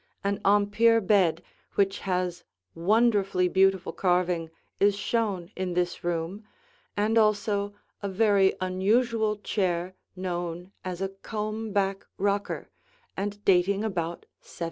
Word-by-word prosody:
An 200 0 -1
Empire 205 +3 +4
bed 190 -5 +2 0.3
which 195 -1 +2
has 180 -2 -2 0.3
wonderfully 200 0 +2
beautiful 190 0 +2
carving 180 -3 +1 0.3
is 200 0 +4
shown 205 -4 -1
in 185 -2 -3
this 180 0 -1
room, 175 +4 -2 0.5
and 220 +2 +3
also 205 -1 +1 0.3
a 200 - -2
very 200 -1 +3
unusual 215 +4 +1
chair 185 -3 -1 0.2
known 175 -1 -4
as 185 0 -4
a 195 - -1
comb 215 +2 -5
back 195 -1 0
rocker 200 0 -1 0.4
and 205 +1 -4
dating 195 +2 +3
about 175 -5 -2 0.2
1750. - - -16
195 Hz, 120 wpm, -27 LUFS, 180-205 Hz, 0.5 s, Empire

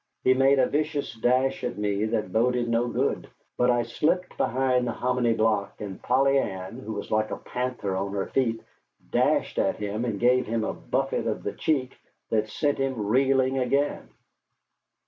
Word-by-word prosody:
He 130 - +5
made 135 +1 +4
a 130 - +5
vicious 150 +1 -1
dash 130 +4 +1
at - - -3
me 105 0 0
that 110 -4 -2
boded 120 +1 +2
no 115 +1 +1
good, - - -1 0.3
but 125 - +2
I 120 -1 +3
slipped 160 +10 -1
behind 125 -1 +1
the - - 0
hominy 125 -2 +1
block; 110 -3 0
and 100 -3 -7
Polly 135 0 +3
Ann, 95 +1 -4
who 110 -4 -6
was 100 - -6
like 110 0 +1
a - - -4
panther 125 -6 -3
on 95 +1 -2
her 100 -1 -1
feet, 115 -4 0 0.5
dashed - - +1
at - - +1
him 105 +2 -3
and 110 -5 -2
gave 125 +1 +3
him 115 0 -1
a - - -2
buffet - - -2
in - - -2
the - - -3
cheek 135 -5 -1 0.3
that 110 -1 +1
sent 145 +5 0
him 130 -6 -1
reeling 130 +3 +2
again. 140 +3 0
125 Hz, 180 wpm, -26 LUFS, 110-130 Hz, 0.5 s, He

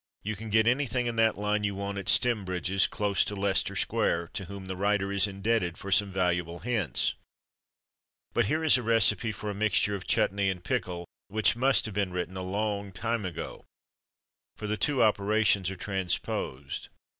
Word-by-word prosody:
You 110 +1 -2
can 110 +2 -8
get 110 +1 +4
anything 125 0 +1
in 120 -1 -2
that 115 0 +3
line 105 0 0
you 100 -1 -1
want 100 0 -3
at 95 - -2
Stembridge's, 95 -5 +2
close 100 -2 +1
to 105 - -4
Leicester 95 -1 0
Square, 85 0 0
to 105 -5 -3
whom 100 +1 -8
the 95 0 -4
writer 100 +1 +1
is 100 +1 +3
indebted 100 -2 -1
for 100 - -7
some 100 +1 +4
valuable 90 -2 0
hints. 105 - 0 1.2
But - - +2
here 155 +9 0
is 155 -5 +5
a - - -3
recipe 115 -1 +3
for 105 0 -5
a - - -4
mixture 105 0 +1
of 100 -3 -5
chutnee 100 0 +2
and 90 -2 -4
pickle, 85 0 -2 0.2
which 110 +2 +2
must 130 +3 +3
have 110 - -5
been 100 -2 -1
written 90 +1 -4
a 95 - -4
long 100 +1 -2
time 110 +2 -2
ago; 90 -3 -6 0.9
for 105 - -6
the 105 +1 0
two 135 +4 +2
operations 105 -2 +3
are 95 - -5
transposed. 90 -8 -3
100 Hz, 180 wpm, -28 LUFS, 95-110 Hz, 1.2 s, is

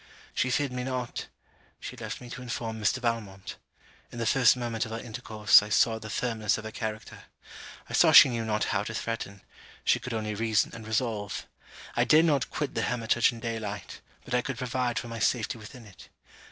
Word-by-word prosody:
'She 130 - 0
feared 140 +1 0
me 125 0 -3
not' 125 -2 -4 0.5
She - - -7
left - - -6
me 125 - -10
to 125 - -7
inform 115 -2 -4
Mr. 105 +5 +2
Valmont. 115 -6 -3 0.5
In - - -9
the 115 - -2
first 125 0 +5
moment 120 -2 -2
of 110 - -6
our 115 - -3
intercourse, 110 -3 +4
I 105 - -7
saw 110 +1 +3
the 110 0 -8
firmness 110 -1 0
of 110 - -7
her 110 - -6
character. 110 -1 -6 0.6
I - - -9
saw - - +6
she - - +10
knew 115 -2 -2
not 110 -1 0
how 95 - +2
to 110 - -5
threaten; 105 -4 -4 0.4
she 125 - +3
could 120 0 -5
only 110 -1 -2
reason 110 0 +1
and 115 -1 -9
resolve. 110 -3 -2 0.5
I - - +3
dared 155 +2 +6
not 145 -6 +1
quit 150 -2 -3
the - - -1
hermitage 120 0 +2
in 120 - -9
day 115 0 -3
light, 105 -1 -7 0.2
but 125 - -7
I 125 - +3
could 135 0 -5
provide 125 -1 -1
for - - -3
my 115 0 -6
safety 115 0 0
within 115 +3 -11
it. 100 -3 -15
115 Hz, 205 wpm, -28 LUFS, 110-125 Hz, 0.6 s, she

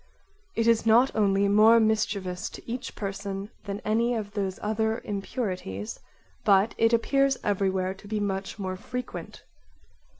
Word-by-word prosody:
It 230 - +1
is 230 -1 +4
not 240 +4 +5
only 200 -2 +3
more 215 +3 +6
mischievous 215 -3 0
to - - -11
each 245 +2 -5
person 200 0 -5
than 200 0 -4
any 230 +3 +1
of 210 -2 -4
those 195 -3 -2
other 220 +1 0
impurities, 190 - -4 0.4
but 200 +2 +4
it 225 0 +4
appears 275 +3 +2
everywhere 190 -2 0
to 195 +2 -15
be 215 0 -2
much 195 -1 -3
more 185 -2 -4
frequent. 250 +5 -7
205 Hz, 140 wpm, -27 LUFS, 195-225 Hz, 0.4 s, more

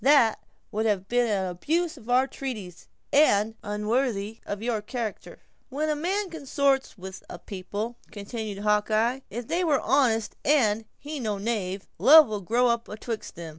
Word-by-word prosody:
"That 270 -6 +5 0.3
would 220 +2 0
have 195 -3 0
been 245 +1 +2
an 195 -3 0
abuse 315 - -1
of 245 -4 -14
our 255 +2 +4
treaties, 220 -11 -7 0.3
and 225 -7 +4
unworthy 210 0 -1
of 205 +1 -4
your 230 -3 -1
character." 225 0 -6 0.3
"When 300 +4 -1
a 305 - +1
man 370 +5 -1
consort 280 -3 +1
much - - -17
with 190 0 -9
a - - -7
people," 205 +6 -5
continued 205 -1 -6
Hawkeye, 215 +4 +2
"if 235 +3 -6
they 355 +2 0
were 300 -5 +3
honest 230 -4 +2
and 225 -7 +3
he 295 +1 -6
no 215 -5 -2
knave, 200 -3 -3
love 310 +2 +9
will 210 -2 -4
grow 235 +7 +2
up 235 0 -1
atwixt 220 +1 -6
them. 170 -1 -7
225 Hz, 170 wpm, -26 LUFS, 205-270 Hz, 0.3 s, love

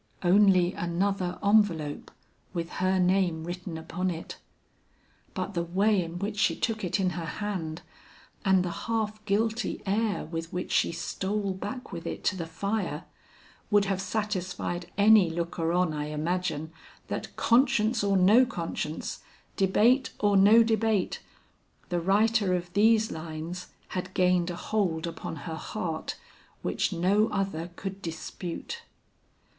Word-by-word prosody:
Only 185 -1 +5
another 180 +1 -1
envelope 190 -8 +2 0.5
with 170 -1 -3
her 185 0 +3
name 180 -3 +2
written 175 0 -5
upon 180 +3 -2
it. 170 -2 -6 1.0
But 190 0 -3
the 170 - 0
way 195 +4 +2
in 170 +1 -6
which 205 +3 -3
she - - +3
took 220 -3 -2
it 180 +2 0
in 185 -2 +1
her 170 0 -4
hand, 165 -1 -4 0.6
and 190 -2 +4
the 175 - -2
half 215 0 -2
guilty 220 +3 0
air 210 +1 0
with 165 0 -5
which 180 0 -4
she - - +3
stole 195 +4 -2
back 250 +7 -6
with 170 -3 -6
it - - -5
to 190 - +1
the 170 -3 -4
fire, 175 -1 -2 0.7
would 205 -1 +4
have 195 -1 -1
satisfied 185 -4 -3
any 205 -3 +6
looker 165 0 -2
on 180 -2 +2
I 150 -1 -2
imagine, 160 0 -2 0.4
that - - -5
conscience 235 -2 +3
or 200 -1 +3
no 205 +7 +6
conscience, 165 -8 -4 0.4
debate 220 +7 +3
or 205 -1 +3
no 210 +4 +7
debate, 220 -3 +1 0.7
the 175 -1 0
writer 205 +1 +3
of 175 0 -5
these 220 +2 +4
lines 160 +2 -6 0.2
had 185 0 -5
gained 180 -1 +3
a 175 - -3
hold 180 -4 -1
upon 165 -1 -5
her 165 - -4
heart, 160 0 -4 0.5
which - - 0
no 195 +5 +3
other 195 -5 -2
could 195 +1 -6
dispute. 175 - -6
185 Hz, 140 wpm, -28 LUFS, 170-210 Hz, 1.0 s, no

